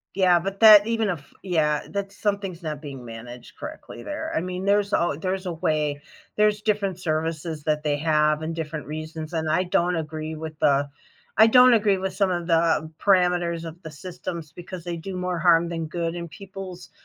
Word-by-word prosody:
Yeah, 185 -2 +5
but 195 +2 -5
that, 215 -2 +9
even 225 -2 0
if 160 -7 -6
yeah, 155 -5 0
that's 200 0 -4
something's 200 -4 -2
not 155 -3 -5
being 135 -4 -8
managed 120 +1 -10
correctly 310 +1 -9
there. 315 +2 -4
I - - +1
mean, 180 +1 -4
there's 200 0 +2
al 170 -4 +1
there's 185 +2 -3
a 175 - -2
way, 150 -2 -1 0.3
there's 210 0 +2
different 205 -4 0
services 160 -1 -2
that 150 0 0
they 150 -1 0
have 155 0 +2
and 165 +1 -3
different 155 -2 -5
reasons, 155 +1 -6
and 160 -1 -1
I 170 +4 +2
don't 175 0 +1
agree 155 0 -4
with 155 -1 -7
the 140 0 +3 0.5
I 220 +1 +8
don't 250 +2 +7
agree 205 -3 +3
with 190 0 -3
some 195 0 +1
of 175 -1 -2
the 165 -2 +2
parameters 180 -3 +2
of 165 +2 -9
the 160 - -8
systems 165 0 -7
because 175 +1 -9
they 175 -1 -4
do 185 +3 -6
more 180 -1 -2
harm 170 0 +4
than 165 -2 -4
good 165 +1 -2
and 170 -1 -6
people's 190 0 -9
170 Hz, 195 wpm, -24 LUFS, 155-195 Hz, 0.5 s, that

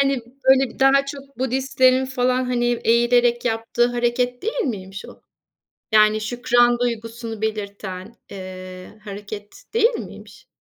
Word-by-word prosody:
Hani 275 -2 +2 0.3
böyle 265 -1 +5
bir - - -16
daha 275 +1 +4
çok 275 -1 -9
Budistlerin 260 0 +2
falan, 255 0 0
hani, 245 -1 -1 0.2
eğilerek 240 +1 +3
yaptığı 230 0 +1
hareket 245 +1 -1
değil 455 +4 -2
miymiş 195 -5 -5
o? - - -13 0.7
Yani 215 0 +5
şükran 240 +2 +2
duygusunu 230 -2 -4
belirten, 200 -1 -5
eee, 185 +1 -9
hareket 205 - -9
değil 460 +1 +4
miymiş? 460 - -9
240 Hz, 125 wpm, -22 LUFS, 215-255 Hz, 0.7 s, böyle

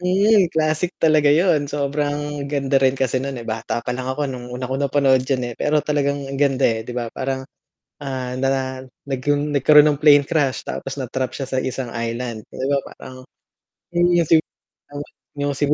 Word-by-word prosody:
Hmm, 190 +1 +3
classic 160 +2 -1
talaga 155 -2 +3
yun, 150 -1 +3
sobrang 145 0 -2
ganda 140 -1 +1
rin 135 0 +3
kasi 130 -1 0
nun 135 0 -4
eh, 120 - -7
bata 115 +1 -3
pa 125 - -2
lang 130 +1 -4
ako 140 +3 -1
nung 125 -3 -6
unang 130 +3 -2
panood 135 -1 +3
'yan 125 -3 -1
eh, - - -11
pero 150 0 +1
talagang 140 -2 -1
ganda 135 -2 +2
eh, 115 -1 +2
'di 125 - -6
ba? 120 -2 -3
Parang 130 0 -3 0.6
ah, 130 -3 -4
na 130 0 -1 0.2
nagk 135 -2 -4
nagkaroon 145 0 +5
ng 150 -2 +1
plane 145 -2 +6
crash 140 -4 0
tapos 135 +1 -5
na-trap 130 0 -3
siya 135 - -3
sa 130 0 -2
isang 130 -2 -4
island 115 -1 -4
'di 130 - -5
ba 140 0 +1 0.2
parang, 130 0 -12 0.6
yung 175 0 +2 1.2
yung 145 0 -2
sigu 145 +1 +2
135 Hz, 170 wpm, -21 LUFS, 130-145 Hz, 1.2 s, plane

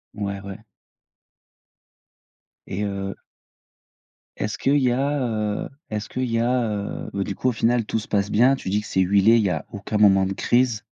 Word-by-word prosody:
Ouais, 100 -1 -3
ouais. 100 +2 -9 2.0
Et 100 - -4
heu 100 -1 -3 1.2
est-ce 105 0 -3
qu'il 140 +2 +2
y 130 -3 +2
a, 140 +3 0
heu, 105 -2 -2 0.2
est-ce 105 0 -4
qu'il 130 -1 -2
y 115 - +1
a, 125 +1 +1
heu, 100 -1 -4
bah, 100 0 -1
du 100 - -5
coup, 130 - 0
au - - +2
final, 115 0 +1
tout 110 - -1
se - - -9
passe 100 -1 0
bien, 125 +5 +5
tu 95 - -6
dis 105 +2 +1
que - - -10
c'est 95 - +1
huilé, 100 +4 +5
il 110 - +2
y 100 - +1
a 80 -4 -3
aucun 100 +1 -3
moment 95 -2 +5
de 95 - -2
crise. 120 0 +1
105 Hz, 190 wpm, -23 LUFS, 100-120 Hz, 2.0 s, bien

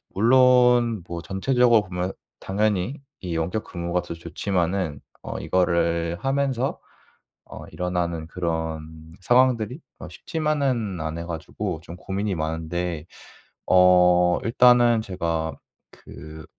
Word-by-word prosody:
물론 125 -1 +4
뭐 85 -1 -5
전체적으로 120 +4 +3
보면 90 0 -4 0.3
당연히 105 - -1 0.2
이 90 -3 -4
원격 85 +7 -2
근무가 85 0 -3
더 - - -7
좋지만은 85 -1 -2 0.2
어 - - -6
이거를 85 -2 0
하면서 135 -1 -1 0.7
어 - - -10
일어나는 85 -2 -3
그런 80 -2 -5
상황들이 125 - +2 0.2
어 - - -8
쉽지만은 140 - -2
않아 80 +1 -4
가지고 85 +2 -5
좀 85 - -9
고민이 95 +1 -3
많은데 80 +1 -3 0.6
어 90 -1 +5
일단은 120 -1 +5
제가 85 -5 -3 0.4
그 80 0 -12
90 Hz, 240 characters per minute, -24 LUFS, 85-115 Hz, 0.7 s, 어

